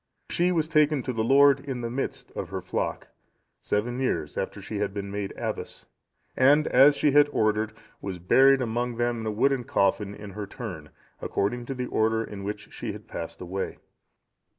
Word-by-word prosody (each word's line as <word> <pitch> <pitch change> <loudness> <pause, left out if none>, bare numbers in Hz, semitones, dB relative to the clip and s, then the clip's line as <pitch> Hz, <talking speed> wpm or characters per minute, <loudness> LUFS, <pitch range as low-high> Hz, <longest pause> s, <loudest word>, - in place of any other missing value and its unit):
She 175 +1 +2
was 160 -3 +1
taken 150 -4 +3
to 130 - -3
the 110 -1 0
Lord, 140 +3 +6
in 135 -3 -5
the 115 - -3
midst 135 +3 -4
of - - -5
her - - -3
flock, - - -3 0.5
seven 120 +5 -1
years 100 - -1
after - - -3
she - - -5
had 100 - -2
been 100 -1 -4
made 100 -1 -3
abbess; - - -5 0.5
and, 145 +4 +5
as 140 +3 +7
she 145 - +2
had 145 +1 +6
ordered, 110 -1 +1 0.3
was 95 -2 -4
buried 130 +9 +5
among 120 +1 -2
them 120 0 0
in 110 - -4
a - - 0
wooden 130 +4 +1
coffin 100 -1 +1
in 105 -1 -9
her 105 +1 -6
turn, 90 -9 -7 0.3
according 120 +4 -1
to 135 - -3
the 125 0 -3
order 110 -1 +1
in 100 -3 -8
which 105 +1 -6
she - - -5
had - - -11
passed 85 0 -7
away. 95 +2 -4
120 Hz, 190 wpm, -26 LUFS, 105-135 Hz, 0.5 s, as